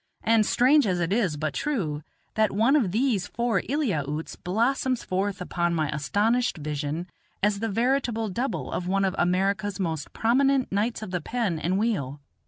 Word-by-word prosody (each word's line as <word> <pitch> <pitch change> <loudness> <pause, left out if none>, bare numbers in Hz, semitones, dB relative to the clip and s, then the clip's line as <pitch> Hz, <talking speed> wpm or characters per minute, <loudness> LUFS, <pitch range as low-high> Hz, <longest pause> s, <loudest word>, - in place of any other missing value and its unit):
And, 225 -1 +3
strange 270 +1 +4
it 175 -1 0
is, 195 -9 +1
but 155 -1 -2
true, 170 - -2 0.3
that 215 -2 +2
one 225 +8 +3
of 230 -12 +2
these 225 -3 +1
four 235 -1 0
Eliautes 160 - -1
blossoms 245 +6 0
forth 195 +1 -1
upon 175 -1 -1
my 155 -2 0
astonished 205 - +1
vision 150 +2 -3 0.4
as 205 -1 +2
the 225 +1 -1
veritable 235 0 0
double 240 +8 -3
of 180 - -3
one 195 +1 +2
of 190 - 0
America's 195 +3 +1
most 160 -5 -3
prominent 265 +3 +2
knights 215 +3 -1
of 190 - -7
the 180 -2 -2
pen 205 -4 -1
and 180 +4 0
wheel. 175 - -1
200 Hz, 165 wpm, -26 LUFS, 175-235 Hz, 0.4 s, strange